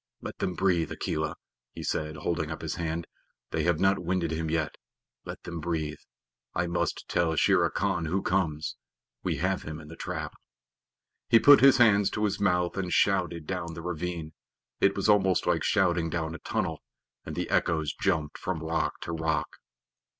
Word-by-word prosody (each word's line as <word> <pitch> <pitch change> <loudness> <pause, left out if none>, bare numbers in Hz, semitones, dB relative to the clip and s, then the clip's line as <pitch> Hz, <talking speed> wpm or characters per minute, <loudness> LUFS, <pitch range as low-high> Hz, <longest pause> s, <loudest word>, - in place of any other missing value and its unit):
"Let - - -8
them 90 - -1
breathe, 90 -4 +1
Akela," - - -2 0.4
he - - -7
said, 75 0 -2
holding 80 +1 -2
up 80 - -6
his - - -2
hand. 85 -1 -3 0.5
"They 80 - 0
have 85 -2 +2
not 95 0 +3
winded 90 -1 -1
him 80 0 -2
yet. 80 -1 0 0.5
Let - - -8
them 85 -1 -5
breathe. 80 -2 -2 0.6
I - - +1
must 85 0 -2
tell 80 -2 +1
Shere - - +4
Khan 80 - -1
who 95 +5 -1
comes. 80 -5 -1 0.4
We - - -1
have 95 +2 0
him 75 0 -6
in 75 -1 -12
the 80 - -9
trap." - - -4 1.0
He 115 - +8
put 145 +4 +8
his 135 0 +7
hands 105 -5 +5
to 105 - -2
his 100 -1 -1
mouth 90 -2 +1
and 90 -2 -2
shouted 90 -5 +2
down 85 -1 -4
the 85 - -7
ravine 85 -2 -4 0.5
it 100 - +3
was 100 - 0
almost 95 -4 +4
like - - +1
shouting 90 -5 +2
down 80 -1 -2
a - - -7
tunnel - - -2 0.4
and - - -6
the - - -2
echoes 80 -3 +1
jumped 75 -1 -1
from 85 -4 -3
rock 80 +1 -1
to - - -4
rock. 80 -1 -1
85 Hz, 180 wpm, -28 LUFS, 80-95 Hz, 1.0 s, He